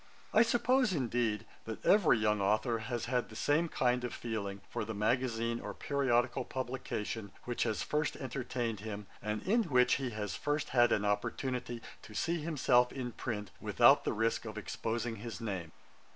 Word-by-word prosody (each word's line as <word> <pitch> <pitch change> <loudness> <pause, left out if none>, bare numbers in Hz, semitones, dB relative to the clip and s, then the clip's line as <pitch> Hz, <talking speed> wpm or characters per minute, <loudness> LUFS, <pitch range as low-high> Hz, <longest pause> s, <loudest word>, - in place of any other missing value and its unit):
I 220 - +7
suppose, 245 -1 +3
indeed, 120 - 0 0.2
that 110 -1 -6
every 190 - +6
young 105 -1 +2
authour 110 +4 +2
has 120 +1 -3
had 125 0 0
the 110 - -11
same 155 +8 +2
kind 125 -3 +1
of 125 - -3
feeling 100 -4 -4
for - - -3
the 110 0 -5
magazine 115 +1 0
or - - -6
periodical 130 -4 +1
publication 115 -5 -4
which 120 -1 -3
has 110 - -1
first 150 0 0
entertained 125 -4 -3
him, 105 -1 -6 0.2
and 105 0 -3
in 225 +3 +2
which 125 -5 +4
he 130 - -1
has 105 -2 -4
first 145 0 -1
had 120 -2 +4
an 105 - +2
opportunity 120 +3 -2 0.2
to 105 - -12
see 170 +9 0
himself 125 -6 +3
in 125 -2 -4
print, 105 -4 -4
without - - +5
the - - 0
risk 115 +2 0
of 110 -1 -6
exposing 115 +2 -3
his 115 +2 -6
name. 95 -7 -4
120 Hz, 170 wpm, -33 LUFS, 110-130 Hz, 0.2 s, I